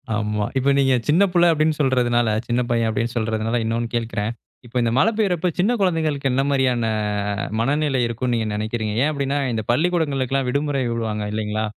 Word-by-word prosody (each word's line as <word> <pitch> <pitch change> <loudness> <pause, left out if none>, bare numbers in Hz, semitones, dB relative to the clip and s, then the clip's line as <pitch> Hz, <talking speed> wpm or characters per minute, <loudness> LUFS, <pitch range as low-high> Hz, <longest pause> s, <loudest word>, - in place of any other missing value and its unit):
ஆமா. 105 0 -1
இப்ப 130 +1 +2
நீங்க 135 -1 +3 0.2
சின்ன 170 +7 +5
பிள்ள 175 -1 +4
அப்படினு 155 0 +1
சொல்றதுனால, 120 -4 +2 0.2
சின்ன 120 +1 +1
பையன் 115 -1 +2
அப்படினு 115 +1 -1
சொல்றதுனால 110 +1 -1
இன்னொன்னு 115 +1 -1
கேட்கிறேன். 115 -2 -2 0.3
இப்போ 120 +1 -6
இந்த 115 -1 +1
மழை 220 +11 +4
பெய்யும்போது 180 -5 0
சின்ன 200 +6 +3
குழந்தைகளுக்கு 160 -7 0
என்ன 135 +2 +2
மாரியான 130 -4 +1 0.7
மனநிலை 140 +2 +1
இருக்கும்னு 120 +2 -2
நீங்க 110 -1 -1
நினைக்கிறீங்க. 110 0 -2
ஏன் 150 - +2
அப்படினா 140 -1 -1 0.2
இந்த 110 -1 -2
பள்ளிக்கூடங்களுக்கெல்லாம் 135 -3 0
இந்த 125 - -1
விடுமுறை 140 -1 0
விடுவாங்க 110 -2 -2
இல்லைங்களா? 110 0 -2
125 Hz, 170 wpm, -21 LUFS, 115-145 Hz, 0.7 s, சின்ன